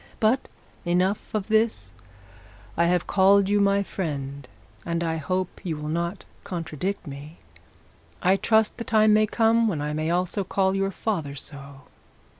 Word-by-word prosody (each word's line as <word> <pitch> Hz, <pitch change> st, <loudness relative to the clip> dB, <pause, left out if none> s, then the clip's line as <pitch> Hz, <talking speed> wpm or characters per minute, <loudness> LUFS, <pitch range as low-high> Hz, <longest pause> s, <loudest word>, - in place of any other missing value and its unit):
But 230 Hz, +4 st, +2 dB, 0.3 s
enough 180 Hz, +3 st, 0 dB
of 210 Hz, -3 st, -2 dB
this; 215 Hz, -, +1 dB, 0.8 s
I 170 Hz, -, +3 dB
have 175 Hz, 0 st, +1 dB
called 195 Hz, 0 st, +4 dB
you 205 Hz, 0 st, +3 dB
my 200 Hz, 0 st, +3 dB
friend, 140 Hz, -8 st, -5 dB, 0.4 s
and 170 Hz, 0 st, -2 dB
I 165 Hz, -1 st, -1 dB
hope 185 Hz, +4 st, -3 dB
you 165 Hz, -4 st, -3 dB
will 150 Hz, 0 st, -5 dB
not 170 Hz, +4 st, -2 dB, 0.2 s
contradict 180 Hz, +2 st, -4 dB
me. 145 Hz, +2 st, -9 dB, 0.8 s
I 185 Hz, +2 st, +3 dB
trust 220 Hz, +1 st, +2 dB
the -, -, -2 dB
time 215 Hz, -2 st, +4 dB
may 215 Hz, 0 st, +4 dB
come 230 Hz, +1 st, +3 dB
when 175 Hz, -8 st, -1 dB
I 150 Hz, +1 st, -2 dB
may 155 Hz, +1 st, -1 dB
also 180 Hz, +3 st, 0 dB
call 190 Hz, +1 st, +1 dB
your 195 Hz, 0 st, 0 dB
father 175 Hz, -8 st, -3 dB
so. 140 Hz, -1 st, -9 dB
185 Hz, 155 wpm, -25 LUFS, 155-205 Hz, 0.8 s, called